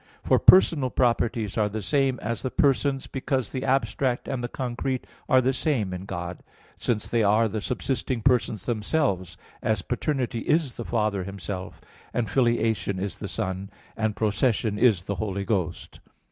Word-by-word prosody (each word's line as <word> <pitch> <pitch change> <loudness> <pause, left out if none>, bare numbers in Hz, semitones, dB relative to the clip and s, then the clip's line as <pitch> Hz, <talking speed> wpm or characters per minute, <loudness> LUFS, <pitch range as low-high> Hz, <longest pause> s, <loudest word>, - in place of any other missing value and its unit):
For - - +4
personal 155 -8 +6
properties 115 -4 +1
are 105 -1 +2
the 110 0 -4
same 135 +1 +1
as 115 -2 -2
the 130 - -2
persons 135 -1 +2
because 130 -3 -2
the 130 - -3
abstract 130 -1 0
and 130 -3 -3
the - - -1
concrete 130 +1 -3 0.2
are 130 - +6
the 130 +1 +1
same 120 -10 0
in 90 +1 -6
God; 85 -2 -5 0.3
since 110 -4 -1
they 115 - +1
are 110 +2 +4
the 110 0 -3
subsisting 125 0 -2
persons 120 -6 +2
themselves, 105 - -1 0.2
as 110 -5 0
paternity 125 -1 -1
is 150 +1 +1
the 120 - -6
Father 105 -4 0
Himself, 95 -1 -6 0.4
and 120 -2 +1
filiation 110 -4 +1
is 95 +1 -4
the 100 - -4
Son, 95 -2 -3 0.3
and 110 -2 -1
procession 110 0 +1
is 110 -8 +4
the 100 +1 -3
Holy 100 -2 -2
Ghost. 95 -7 -2
115 Hz, 160 wpm, -26 LUFS, 100-130 Hz, 0.4 s, personal